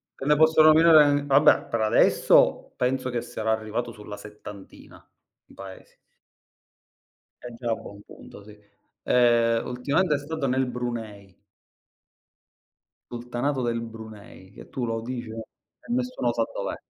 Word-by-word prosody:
te - - -8
ne 150 +1 +4
posso 160 +1 +4
nominare 155 -2 +6
vabbè, 140 +1 +4
per 115 - -2
adesso 110 0 +3
penso 130 +1 -1
che 120 -1 -3
sarà 110 -2 -4
arrivato 110 +2 -3
sulla 105 -2 -10
settantina 105 -1 -13 0.4
di - - -21
Paesi. 95 -1 -13 1.4
È 125 - -9
già 115 0 -4
a - - +1
buon 100 -1 -12
punto, 100 - -14
sì. 105 +1 -15 0.5
Ehm, 115 -2 +2
ultimamente 145 +7 0
è - - -1
stato 145 0 -4
nel 130 +1 0
Brunei. 115 -5 -6 1.8
Sultanato 120 +3 -3
del 120 -1 -2
Brunei, 110 -4 -12
che - - -14
tu 125 - -4
lo 115 -1 -3
dici 120 0 -6
e 110 - -8 0.5
e - - -1
nessuno 250 - -2
sa 115 - 0
dov'è. - - -4
120 Hz, 140 wpm, -24 LUFS, 110-135 Hz, 1.8 s, nominare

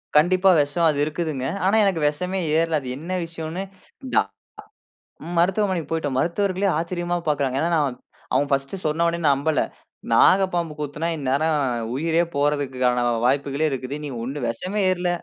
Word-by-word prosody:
கண்டிப்பா. 185 +5 +5
வெஷம் 150 +4 +2
அது 150 - 0
இருக்குதுங்க. 150 -4 -3 0.2
ஆனா 195 +3 +3
எனக்கு 185 -5 +1
வெஷமே 180 +6 -2 0.2
ஏற்ல. 165 -1 +2
அது 130 - -7
என்ன 165 +5 -7
விஷயன்னு 165 +2 -5 0.5
டா, - - +5 1.0
நா 165 - -7
மருத்துவமனைக்கு 185 -1 +1
போய்ட்டோம். 150 -5 -1
மருத்துவர்களே 190 +4 0
ஆச்சரியமா 175 +1 -2
பாக்கறாங்க. 140 -3 0
ஏன்னா, 170 - +1
நான் 145 -5 +1 0.4
அவங்க 140 +3 +2
ஃபர்ஸ்ட் 135 +5 0
சொன்னோன 170 +2 +1
நம்பல. 145 +2 +2 0.5
நாகப்பாம்பு 175 -4 +4
கொத்தினா 150 +2 -3
இந்நேரம் 150 +3 +1 0.4
உயிரே 165 +4 +2
போறதுக்கான 130 -4 +1 0.2
வாய்ப்புகளே 140 +3 +1
இருக்குது. 135 +1 -4
நீ - - -4
ஒண்ணும் 135 +1 -4
விஷமே 185 - -3
ஏறல. 180 -1 -1
155 Hz, 140 wpm, -23 LUFS, 140-175 Hz, 1.0 s, கண்டிப்பா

